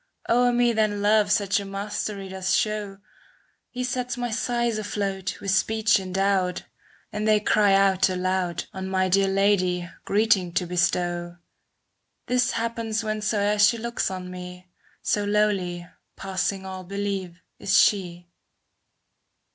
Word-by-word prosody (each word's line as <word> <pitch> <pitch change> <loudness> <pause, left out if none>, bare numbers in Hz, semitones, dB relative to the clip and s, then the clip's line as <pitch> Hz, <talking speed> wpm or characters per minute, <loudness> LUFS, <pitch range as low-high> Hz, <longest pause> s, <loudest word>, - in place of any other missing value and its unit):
O'er 245 +1 +3
me 240 0 +2
then 210 -2 0
Love 210 -1 +3
such 200 0 +1
mastery 200 0 -4
doth 190 0 -4
show. 210 -1 0 0.7
He 250 0 -4
sets 250 0 -2
my 245 -1 -3
sighs 235 0 -1
afloat, 195 -3 -3
with 195 - -2
speech 220 +1 +2
endowed;^" 190 -1 0 0.5
And 210 +1 -2
they 215 -1 +5
cry 205 -1 +3
out 195 -1 +3
aloud 185 -2 -1
On 190 0 -5
my 185 0 +1
dear 195 +1 +3
Lady, 190 -3 +1 0.2
greeting 200 -4 +2
to 180 - 0
bestow. 175 0 -1 0.9
This 250 -1 +1
happens 230 -1 -2
whensoe'er 210 -1 0
she 210 +3 +5
looks 235 +1 -2
on 185 -1 -6
me. 180 0 -9 0.3
So 205 - +1
lowly, 200 -4 0 0.3
passing 190 0 -2
all 190 -1 -7
belief, 195 -2 -4 0.2
is 195 - +2
she. 175 -4 +2
200 Hz, 130 wpm, -25 LUFS, 185-215 Hz, 0.9 s, they